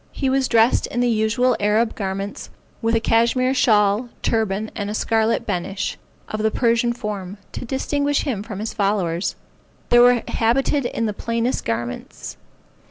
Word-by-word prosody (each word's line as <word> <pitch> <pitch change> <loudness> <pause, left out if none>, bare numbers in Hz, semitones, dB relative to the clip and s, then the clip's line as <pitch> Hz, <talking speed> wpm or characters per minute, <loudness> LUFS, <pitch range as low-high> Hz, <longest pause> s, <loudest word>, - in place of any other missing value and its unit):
He 265 -1 -1
was 265 -1 +2
dressed 230 +1 +3
in 240 - -3
the 245 - +2
usual 230 +3 +2
Arab 215 +3 +2
garments, 195 0 -4 0.3
with 230 0 +1
a - - +3
cashmeer 235 +3 +2
shawl, 215 -2 +3
turban, 220 -1 0
and 205 -1 -3
a 210 - -3
scarlet 225 +1 +1
benish, 190 +3 -2 0.3
of 215 - -4
the 220 - +2
Persian 235 +1 +2
form, 210 -5 -5
to - - -6
distinguish 285 +3 0
him 240 -9 -2
from 210 -2 -7
his 215 +2 -4
followers. 195 -4 0 0.5
There 240 - +6
were 245 -1 +5
habited 255 +3 +1
in 230 - -2
the 210 - -1
plainest 230 +4 -2
garments. 120 +1 -4
225 Hz, 160 wpm, -21 LUFS, 205-245 Hz, 0.5 s, There